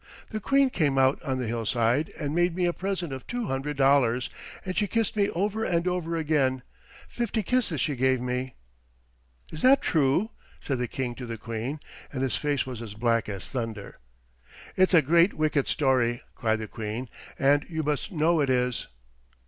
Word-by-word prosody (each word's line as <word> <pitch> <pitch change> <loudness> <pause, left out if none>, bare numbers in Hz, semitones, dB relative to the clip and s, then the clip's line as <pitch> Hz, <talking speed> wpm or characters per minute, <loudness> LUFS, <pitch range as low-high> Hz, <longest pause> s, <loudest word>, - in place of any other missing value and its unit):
The 215 - -2
Queen 275 +4 +3
came 145 - +1
out 130 +1 +3
on 135 -5 -2
the 125 - -2
hillside 115 +4 0
and 145 -2 -2
made 175 0 +2
me 180 -1 +1
a 175 - +1
present 185 -5 -3
of 130 -2 -8
two 245 -1 -2
hundred 140 -1 -3
dollars, 135 -3 +3 0.3
and 185 -1 -3
she 205 - +1
kissed 225 +1 0
me 205 -1 +2
over 210 +5 -1
and 170 -3 0
over 170 -2 -1
again; 140 -5 +1 0.4
fifty 230 -2 -2
kisses 220 - 0
she 145 +3 0
gave 130 0 +2
me." 125 +1 -3 1.0
"Is 155 - -7
that 270 +2 +6
true?" 160 - +2 0.3
said 135 -3 -2
the 125 - -1
King 125 0 -3
to 125 0 -8
the 115 -1 -5
Queen; 115 +7 -4 0.3
and 130 -2 -2
his 130 -4 0
face 145 -3 0
was 125 -3 -6
as 105 -3 -8
black 115 -1 +1
as 100 -3 -5
thunder. 115 -5 -5 0.8
"It's 185 0 +4
a 160 - +6
great 170 +6 +4
wicked 155 -3 +1
story," 125 -4 +1
cried 110 -1 0
the 110 -1 -5
Queen, 110 +4 -5 0.3
"and 145 +1 +3
you 160 -2 -2
must 145 -5 -2
know 165 0 +2
it 140 - +1
is." 125 -1 0
140 Hz, 185 wpm, -27 LUFS, 125-175 Hz, 1.0 s, that